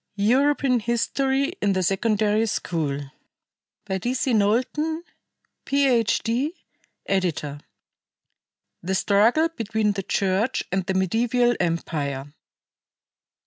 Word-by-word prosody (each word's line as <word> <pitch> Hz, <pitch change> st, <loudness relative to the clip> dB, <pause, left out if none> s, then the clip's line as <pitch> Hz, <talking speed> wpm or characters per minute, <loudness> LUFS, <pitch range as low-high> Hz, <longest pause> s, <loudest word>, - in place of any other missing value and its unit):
European 255 Hz, +4 st, +2 dB
History 265 Hz, +6 st, 0 dB
in 200 Hz, -, +2 dB
the 185 Hz, 0 st, 0 dB
Secondary 215 Hz, +3 st, +1 dB
School 160 Hz, -9 st, -2 dB, 0.9 s
D. 190 Hz, +6 st, -1 dB
C. 260 Hz, -1 st, 0 dB
KNOWLTON, 255 Hz, +10 st, +1 dB, 0.6 s
PH.D., 260 Hz, -, +1 dB, 0.5 s
Editor. 165 Hz, -7 st, -1 dB, 1.2 s
THE 190 Hz, +2 st, -2 dB
STRUGGLE 225 Hz, +12 st, +3 dB
BETWEEN 220 Hz, -7 st, -1 dB
THE 195 Hz, -1 st, -3 dB
CHURCH 195 Hz, +5 st, 0 dB
AND 190 Hz, -1 st, -1 dB
THE 190 Hz, -, -1 dB
MEDIEVAL 240 Hz, +6 st, +2 dB
EMPIRE. 145 Hz, -5 st, -2 dB
215 Hz, 90 wpm, -24 LUFS, 190-250 Hz, 1.2 s, STRUGGLE